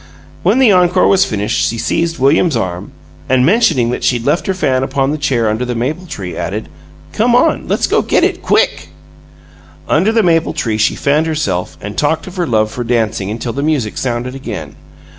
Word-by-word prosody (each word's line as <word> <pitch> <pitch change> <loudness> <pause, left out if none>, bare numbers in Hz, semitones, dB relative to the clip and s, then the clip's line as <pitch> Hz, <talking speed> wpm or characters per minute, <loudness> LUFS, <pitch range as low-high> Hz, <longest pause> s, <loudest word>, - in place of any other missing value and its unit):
When - - +2
the 260 -5 +5
encore 180 -1 +3
was 190 -1 +4
finished 105 -1 -1
she 115 - -4
seized 165 +7 -1
William's 140 +2 +2
arm, 90 -2 -4 0.4
and, 130 0 +3
mentioning 150 - +2
that - - -4
she'd 120 -2 0
left 150 +5 0
her 190 - +1
fan 130 -8 0
upon 135 +1 0
the 155 - -2
chair 130 -6 0
under 110 +3 -1
the 125 -1 -3
maple 150 +10 -3
tree, 95 - -6
added, - - -4 0.4
"Come - - +2
on! - - +2
Let's - - +1
go - - +2
get - - +1
it - - 0
QUICK!" 80 0 +1 1.0
Under 185 +8 +2
the 225 -1 +2
maple 165 -2 +2
tree 110 -2 -2
she 110 - +2
fanned 150 +3 +1
herself 100 - -2
and 105 +1 -7
talked 150 +2 0
of 185 0 -10
her 175 -2 -1
love 110 -3 +1
for 120 - -4
dancing 110 -4 -1
until 115 +2 -4
the 140 - -3
music 145 -8 -1
sounded 125 0 -3
again. 135 0 -7
130 Hz, 200 wpm, -15 LUFS, 115-165 Hz, 1.0 s, the